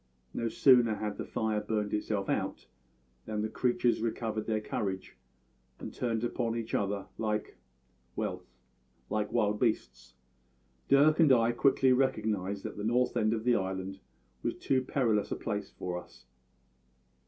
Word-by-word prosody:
No 115 - -1
sooner 120 -2 +5
had 105 -1 -4
the - - -3
fire 110 -1 -1
burned 105 -1 -2
itself 105 -2 -1
out - - -2 0.6
than 105 -1 -2
the 110 - -1
creatures 120 0 +1
recovered 110 -1 -2
their 110 -1 +1
courage 95 -3 -4 0.6
and - - -7
turned 115 -2 -1
upon 115 -1 -1
each 115 -1 -4
other 100 -1 0
like 105 -1 -2 0.6
well, - - -3 0.7
like 105 0 -1
wild 105 0 +1
beasts. 65 - -1 0.7
Dirk 150 +3 +5
and 155 -4 +6
I 115 -2 +5
quickly 130 +1 +4
recognised 105 -7 0
that - - -6
the 105 - -4
north 125 +3 +1
end 110 -2 +2
of 110 -1 -1
the 120 0 +3
island 95 0 -3 0.4
was - - -1
too 130 -1 +1
perilous 120 -5 0
a - - 0
place 105 -2 -3
for 90 -1 -4
us. 65 -5 -19
110 Hz, 150 wpm, -31 LUFS, 105-120 Hz, 0.7 s, and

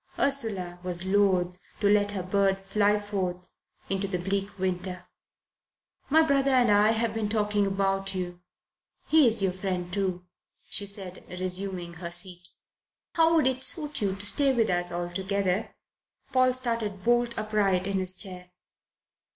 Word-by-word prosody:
Ursula 205 -11 +1
was 180 0 -3
loath 190 -2 +1 0.2
to 205 - +2
let 205 0 +3
her 190 -3 -3
bird 195 +1 +1
fly 205 +2 +1
forth 185 -3 -4 0.4
into 195 +1 -1
the 185 -2 -2
bleak 195 +3 -2
winter. 185 -1 -3 1.0
"My 320 +3 +5
brother 275 -2 +2
and 250 -4 +4
I 205 +1 +5
have 225 0 -1
been 220 -2 -2
talking 210 -2 +1
about 195 0 -1
you 175 -1 -5 0.6
he 310 -4 +5
is 220 -3 +2
your 190 - +2
friend, 180 -1 -4
too," 185 -2 -2 0.5
she 205 -2 +1
said, 195 -2 +2
resuming 185 -1 -2
her 170 +1 -7
seat. 175 0 -1 0.6
"How 330 0 +3
would 315 - +3
it 260 0 0
suit 300 -4 -2
you 195 -2 0
to 200 +1 -4
stay 275 +6 +3
with 230 -6 +1
us 175 0 +1
altogether?" 185 +3 -2 0.6
Paul 255 0 +4
started 230 -6 -2
bolt 240 0 +2
upright 205 -4 0
in 195 -1 -1
his 185 0 0
chair. 180 -2 -5
195 Hz, 150 wpm, -27 LUFS, 185-220 Hz, 1.0 s, My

